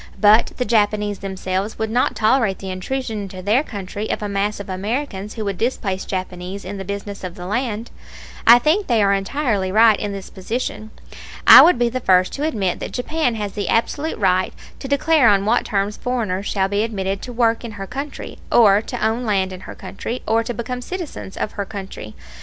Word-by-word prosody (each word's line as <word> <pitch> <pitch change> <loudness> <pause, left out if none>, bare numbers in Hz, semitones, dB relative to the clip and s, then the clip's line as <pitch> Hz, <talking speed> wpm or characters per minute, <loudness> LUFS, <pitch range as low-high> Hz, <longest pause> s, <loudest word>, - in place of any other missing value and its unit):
But 215 +2 +5
the 250 - -1
Japanese 210 -3 +1
themselves 190 +1 -3
would 220 0 -2
not 245 +2 +1
tolerate 220 -3 +2
the 190 -1 -6
intrusion 220 +3 -3
into 185 -2 -8
their 215 +7 +3
country 205 -4 -6
of - - -2
a - - -1
mass 200 +1 -1
of 200 - -7
Americans 205 +2 -3
who 220 -2 -4
would 195 -3 -3
displace 205 -6 -1
Japanese 185 0 -5
in 200 +2 -5
the - - -4
business 200 +1 -6
of 180 -1 -6
the 180 -3 -8
land. 230 +2 -2 0.6
I 235 +1 +10
think 320 +11 +1
they 230 -4 +3
are 200 0 +3
entirely 200 -2 -1
right 220 0 +5
in 205 - -3
this 195 -1 -7
position. 215 +2 -4 0.6
I - - +12
would 355 - +6
be 240 0 +2
the 250 +2 -2
first 185 -5 +3
to 285 - -3
admit 195 - -1
that - - -6
Japan 255 -1 -1
has 205 -2 -3
the 205 -2 -3
absolute 290 +7 0
right 185 -2 +1 0.2
to - - -6
declare 280 -2 +4
on 200 -1 +3
what 235 +3 +2
terms 200 0 -1
foreigners 210 -6 -2
shall 195 -2 +1
be 200 +1 0
admitted 195 -3 -2
to 250 - -7
work 230 -1 +1
in 230 -2 -6
her 195 -1 -6
country, 275 +7 -7
or 210 -3 +6
to 220 - -3
own 225 +3 0
land 195 -4 0
in 185 - -8
her - - -7
country, 235 +5 -6
or 225 +1 +2
to 240 - -4
become 250 +3 -4
citizens 335 - -6
of - - -2
her 200 - -4
country. 195 - -8
210 Hz, 205 wpm, -20 LUFS, 195-240 Hz, 0.6 s, I